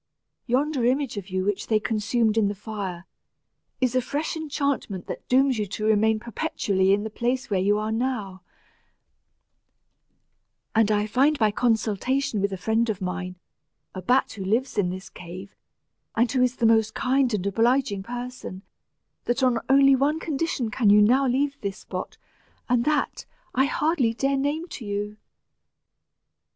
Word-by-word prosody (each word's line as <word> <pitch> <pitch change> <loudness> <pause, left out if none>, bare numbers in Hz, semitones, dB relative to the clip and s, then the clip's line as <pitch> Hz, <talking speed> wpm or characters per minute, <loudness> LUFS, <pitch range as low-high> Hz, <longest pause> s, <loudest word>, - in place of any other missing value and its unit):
Yonder 270 +2 +1
image 260 +1 +1
of 200 -1 -6
you 185 0 -1
which 205 -1 -1
they 215 -1 +3
consumed 220 +1 0
in 220 -3 +3
the 205 - -2
fire, 195 -4 -6 0.7
is 255 -2 +1
a 255 - +2
fresh 290 +7 -3
enchantment 280 - -2
that - - -8
dooms 260 -1 +3
you 210 - -1
to 210 +2 -4
remain 220 0 +3
perpetually 200 -4 0
in 205 +1 +2
the 220 - -4
place 245 +3 -2
where 195 - +2
you 200 +3 +3 0.2
now 250 +3 0 0.2
are; 185 - -16 2.3
and 225 -1 +3
I 210 0 +2
find 270 +8 +2
by 215 -5 +3
consultation 225 +1 0
with 200 0 0
a 190 - -3
friend 225 +5 +1
of 205 -3 -2
mine, 185 -1 -4 0.6
a 185 - -6
bat 250 +8 +2
who 200 - -6
lives 230 +8 0
in 190 -3 +1
this 185 0 -6
cave, 180 +3 -10 0.6
and 235 +1 +2
who 260 - +1
is 250 -1 +2
the 235 - 0
most 220 -1 +3
kind 265 -1 +2
and 200 -4 -1
obliging 225 0 +1
person, 245 -3 -7 0.6
that 245 +3 0
on 250 -2 +3
only 275 0 +6
one 290 +4 +1
condition 290 -7 -2
can 220 -2 +2
you 205 +1 +7
now 255 +6 +4
leave 275 +3 0
this 200 -1 -3
spot, - - -7 0.5
and 245 -2 +2
that, 300 -1 -1 0.3
I 265 - +3
hardly 280 -6 +1
dare 275 +3 +1
name 290 +5 -1
to 255 - -8
you." 205 0 -4
230 Hz, 165 wpm, -25 LUFS, 205-265 Hz, 2.3 s, you